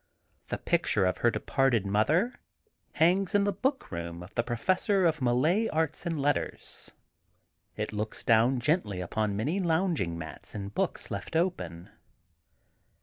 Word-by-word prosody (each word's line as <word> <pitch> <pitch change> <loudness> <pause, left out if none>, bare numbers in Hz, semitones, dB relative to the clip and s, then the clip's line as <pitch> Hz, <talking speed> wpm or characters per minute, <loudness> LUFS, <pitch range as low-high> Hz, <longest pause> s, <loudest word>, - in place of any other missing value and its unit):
The - - -2
picture 95 - +1
of 90 - 0
her 120 - +4
de - - -2
parted 135 -7 +2
mother 150 - +2 0.6
hangs 185 +5 +3
in 205 - +5
the 205 - +2
book 265 +8 -1
room 85 0 -5
of 90 - -13
the 115 - +1
Professor 185 - +1
of 160 -3 +2
Malay 150 - +2
Arts 160 +1 -1
and 165 -3 -1
Letters. 145 +1 -2 0.9
It - - -3
looks 105 +1 -3
down 115 +3 +4
gently 120 - +1
upon 100 +3 -1
many 150 - 0
lounging 165 - 0
mats 80 +5 -9
and 100 -1 -5
books - - -2
left - - -5
open. 90 - -1
135 Hz, 145 wpm, -29 LUFS, -, 0.9 s, in